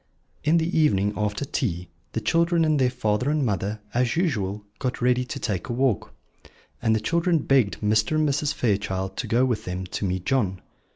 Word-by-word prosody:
In 155 +3 +4
the 165 +2 0
evening, 105 -10 +3
after 105 +4 -1
tea, 90 - -2 0.3
the 115 - -2
children 170 +2 +2
and 155 -2 +2
their 130 -1 +3
father 125 0 0
and 150 -2 +1
mother, 105 0 -2
as 120 -1 +1
usual, 105 - -1 0.2
got 125 -2 -2
ready 125 +1 +2
to - - -6
take 95 -7 -3
a - - -1
walk; 125 -5 0 0.7
and 110 -1 +3
the - - +1
children 170 - +1
begged 135 -7 +2
Mr. 110 +7 +2
and 155 0 +2
Mrs. 145 +1 0
Fairchild 95 -4 -1
to - - -3
go 120 +3 +3
with 115 -4 -1
them 90 +1 -4
to 90 - -5
meet 90 -1 -2
John. 100 -9 +1
120 Hz, 190 wpm, -25 LUFS, 100-145 Hz, 0.7 s, In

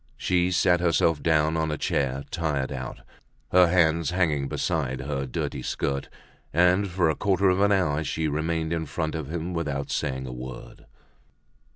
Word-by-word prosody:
She 90 -1 +1
sat 90 0 +3
herself 85 -2 +2
down 80 -1 +2
on 80 -1 0
a 75 - -2
chair, 70 -1 -1
tired 75 -5 -1
out, - - -6 0.5
her 90 -1 +6
hands 85 -2 +3
hanging 80 -6 +1
beside 70 -7 -1
her 70 -1 -3
dirty - - -3
skirt; 70 0 -2 0.4
and 90 +5 +3
for 90 -2 +1
a 80 - +1
quarter 100 -1 +2
of 90 +2 +1
an 100 0 +4
hour 80 -6 +2
she 80 +1 -1
remained 80 +2 -1
in 80 -2 -2
front 80 +1 -3
of 80 -2 -5
him 85 +1 -3
without 70 -4 -3
saying 65 -2 -2
a 65 - -6
word. 65 +1 -9
80 Hz, 170 wpm, -26 LUFS, 70-90 Hz, 0.5 s, her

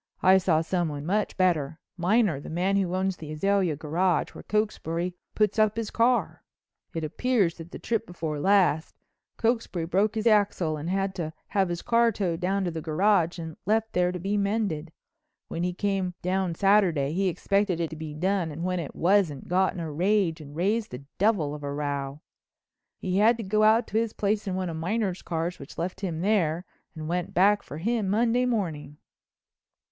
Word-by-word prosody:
I 190 +1 +7
saw 170 -4 +2
someone 160 -4 -2
much 205 +5 -1
better—Miner, 175 - +1
the - - -9
man 180 +4 0
who 185 -2 0
owns 190 0 0
the 155 -1 -8
Azalea 190 0 +1
Garage, 165 +4 0
where - - -10
Cokesbury 180 -5 -1 0.2
puts 215 +1 +2
up 215 0 +3
his 230 -2 -3
car. 240 +2 +1 0.5
It 165 - -2
appears 200 +2 +1
that 165 +1 -9
the - - -8
trip 225 -1 -2
before 160 -4 -4
last 185 -3 +2 0.4
Cokesbury 225 -7 0
broke 200 +6 +1
his 220 0 -2
axle 205 -7 +3
and 155 +3 -5
had 195 +1 0
to 160 -2 -3 0.2
have 195 -3 +1
his 175 0 -4
car 235 0 +3
towed 180 -6 -2
down 190 +2 0
to 175 - -1
the 160 -1 -5
garage 170 +2 +2
and 160 -2 -7
left 220 +1 +1
there 180 0 +2
to 180 - -4
be 195 +4 -1
mended. 200 -6 -1 0.6
When 165 - -4
he 180 +1 0
came 190 -1 -1
down 185 -1 0
Saturday 180 -8 +3
he 195 +2 +1
expected 195 0 0
it 165 -2 -2
to - - -6
be 155 -1 -7
done 185 +1 0
and 160 +3 -6
when 180 0 -1
it 160 - -6
wasn't, 175 -6 +2
got 185 +1 +2
in - - -5
a 160 -2 -4
rage 180 0 +1
and 145 -1 -11
raised 210 +6 0
the 125 +2 -8 0.2
devil 190 -8 +2
of 150 - -7
a 140 -1 -4
row. 140 0 -3 0.8
He 185 +1 -1
had 225 +3 +5
to 230 - -5
go 215 +2 +1
out 220 +2 +5
to 220 - +1
his 230 -1 -1
place 205 +1 -1
in 185 - -1
one 185 -1 -2
of 165 -2 -4
Miner's 190 +2 -1
cars 170 +1 -3
which 140 - -11
left 180 +3 -4
him 170 -5 -3
there 180 -4 +1 0.3
and 155 -1 -6
went 175 +1 -2
back 200 +3 +4
for 145 - -9
him 215 +3 0
Monday 235 +4 +2
morning." 160 - -2
185 Hz, 195 wpm, -27 LUFS, 160-205 Hz, 0.8 s, I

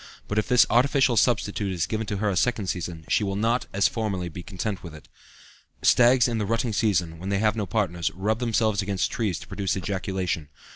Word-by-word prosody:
But 105 - 0
if 105 - -2
this 125 -1 +5
artificial 130 +1 +3
substitute 105 -3 +1
is 90 -3 -1
given 110 -1 -3
to 100 - -2
her 105 +1 0
a - - -2
second 110 +1 +1
season, 85 -3 -4
she - - +2
will 95 -1 -2
not, 115 +4 0
as 95 -2 +3
formerly, 95 -4 -3
be 85 +2 -8
content 95 +1 -4
with 85 -3 -9
it." 75 - -14 0.8
Stags 125 0 +5
in 115 -2 -1
the 105 - -1
rutting 115 +1 0
season, 90 -7 0
when 95 +3 -5
they 100 - +1
have 105 +1 +2
no 105 -3 -2
partners, 90 -4 -1
rub 105 +4 -1
themselves 110 -3 +1
against 100 -1 -1
trees 105 -8 -1
to - - -11
produce 100 -1 -2
ejaculation. 95 -4 -3
100 Hz, 210 wpm, -25 LUFS, 95-115 Hz, 0.8 s, this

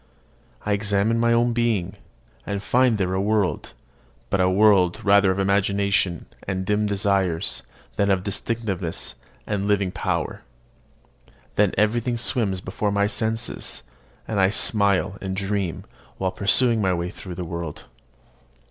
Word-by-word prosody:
I 105 - +1
examine 100 +2 +2
my 115 0 +3
own 120 0 +3
being, 115 -6 0 0.5
and 100 0 -4
find 125 -1 +3
there 95 -2 -1
a 95 - 0
world, 105 -2 0 0.6
but 95 - +2
a 90 - +3
world 95 -2 +4
rather 100 -1 +5
of 95 - 0
imagination 100 -2 +1 0.2
and 95 -1 -2
dim 105 +1 +1
desires, 95 -4 0 0.4
than 100 0 +2
of 95 -2 +2
distinctness 100 -4 -3 0.3
and 100 -1 -2
living 100 -3 +1
power. - - -2 1.1
Then 105 -2 +2
everything 120 +3 +1
swims 110 -6 0
before 100 +3 -2
my 100 0 +2
senses, 110 - -2 0.4
and 110 -3 -1
I 95 0 +4
smile 100 -1 +2
and 95 -1 -3
dream 100 -3 -2 0.3
while 95 -1 -1
pursuing 115 +4 +3
my 95 -2 +2
way 85 +1 -3
through 90 -2 -9
the 90 0 -5
world. 85 -2 -6
100 Hz, 140 wpm, -23 LUFS, 95-105 Hz, 1.1 s, rather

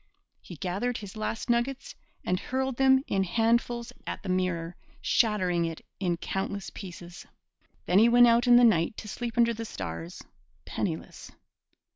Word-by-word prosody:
He 175 - -10
gathered 200 +8 -2
his 205 -2 -9
last 215 +1 -3
nuggets 245 +3 -1 0.3
and 180 0 0
hurled 265 -1 -2
them 265 0 +5
in 195 -1 0
handfuls 235 +4 0
at - - -5
the 195 - -5
mirror, 180 -2 -1 0.2
shattering 185 -7 +1
it 165 -1 -6
in 175 -3 0
countless 195 +3 -4
pieces. 175 -2 -10 0.6
Then 180 +2 +4
he 230 +2 +6
went 245 +1 +7
out 235 +1 +4
in 240 - +8
the 245 - +7
night 185 -4 +3
to 215 - -7
sleep 235 +2 -5
under 235 0 +4
the 225 0 -5
stars, 85 - -7 0.4
penniless. - - -5
215 Hz, 155 wpm, -28 LUFS, 180-240 Hz, 0.6 s, in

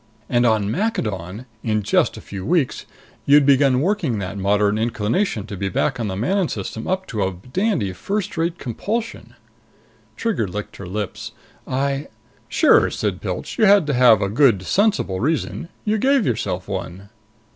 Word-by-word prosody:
And 120 -1 +2
on 110 -2 +1
Maccadon, 110 - -2 0.2
in 110 -2 -1
just 105 - +1
a - - -8
few 95 -2 -7
weeks, 165 - 0 0.4
you'd 145 0 +6
begun 135 -2 +4
working 170 - 0
that 95 -1 -4
moderate 105 +2 +1
inclination 115 - -1
to 105 - -7
be 100 +1 -2
back 130 +7 -1
in 115 - -1
the 95 - -3
Manon 180 - +1
System 110 0 -5
up 190 +1 -1
to 110 - -4
a 95 0 0 0.2
dandy 185 - 0
first 200 - -3
rate 165 +1 -1
compulsion." 220 - -4 0.8
Trigger 220 - -1
licked 105 +3 -6
her 100 - -8
lips. 100 0 -5 0.3
"I 140 +2 -1 0.2
" - - -34
"Sure," - - +4
said - - -3
Pilch. - - -5
"You 220 - +6
had 200 -4 +6
to 145 - -1
have 120 -5 +5
a 100 - 0
good 110 -4 +3
sensible 200 - +1
reason. 160 - -2 0.2
You 215 0 +1
gave 270 -1 +3
yourself 95 -6 -2
one." 95 0 -6
120 Hz, 170 wpm, -21 LUFS, -, 0.8 s, you'd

